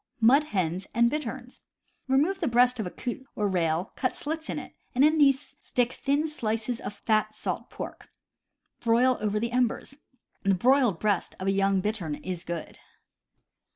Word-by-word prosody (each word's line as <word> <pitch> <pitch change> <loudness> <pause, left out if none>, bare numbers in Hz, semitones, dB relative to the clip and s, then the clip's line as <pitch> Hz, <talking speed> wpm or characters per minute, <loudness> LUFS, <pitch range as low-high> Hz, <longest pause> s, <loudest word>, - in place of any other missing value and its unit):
Mud 265 +6 +5
hens 185 - -2
and 235 +1 +4
Bitterns. 265 -4 -5 0.2
— - - -45
Remove 300 +9 +2
the 330 - 0
breast 245 0 +4
of 210 - -1
a - - -4
coot 250 +7 -5
or 210 - 0
rail, 175 -1 0
cut 255 - -1
slits 315 +2 -4
in - - -2
it, - - -7 0.2
and 265 +3 +6
in 310 +1 +3
these 275 -2 +3
stick 245 0 0
thin 285 +3 0
slices 230 -4 -2
of - - -5
fat 215 +1 0
salt - - -4
pork; - - -8 0.7
broil 245 +2 +3
over 210 0 0
the 235 +2 -2
embers. 250 +2 0 0.4
The 195 -1 +3
broiled 245 -2 +3
breast 205 -4 0
of 185 - -4
a 195 - +3
young 195 -1 +2
bittern 185 -7 -2
is 180 +2 -5
good. 170 -1 -6
235 Hz, 175 wpm, -27 LUFS, 195-265 Hz, 0.7 s, and